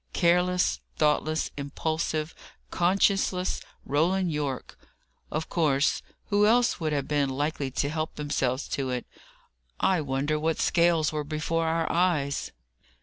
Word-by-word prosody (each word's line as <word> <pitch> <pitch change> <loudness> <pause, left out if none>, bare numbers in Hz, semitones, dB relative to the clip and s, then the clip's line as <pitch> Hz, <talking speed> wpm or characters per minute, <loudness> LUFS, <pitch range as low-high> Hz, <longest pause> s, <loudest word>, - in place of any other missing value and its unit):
Careless, 180 +1 +2 0.2
thoughtless, 155 +1 +1
impulsive, 155 +2 -2 0.4
conscienceless 185 0 +1 0.2
Roland 175 +5 +1
Yorke! 145 -4 -3 0.5
Of 155 +1 -3
course! 150 -4 +2 0.3
Who 205 +1 +4
else 240 +2 +3
would 160 -2 -1
have 140 -2 -1
been 145 -2 +1
likely 145 +1 -2
to 140 +2 -1
help 155 +2 -3
themselves 140 -3 -1
to 135 -2 -2
it? 125 -1 -2 0.7
I 185 -4 +2
wonder 145 +2 -1
what 160 +1 0
scales 170 -2 +3
were 150 -1 -2
before 160 +2 -1
our 165 0 +1
eyes?" 165 -6 +1
155 Hz, 125 wpm, -27 LUFS, 145-175 Hz, 0.7 s, Who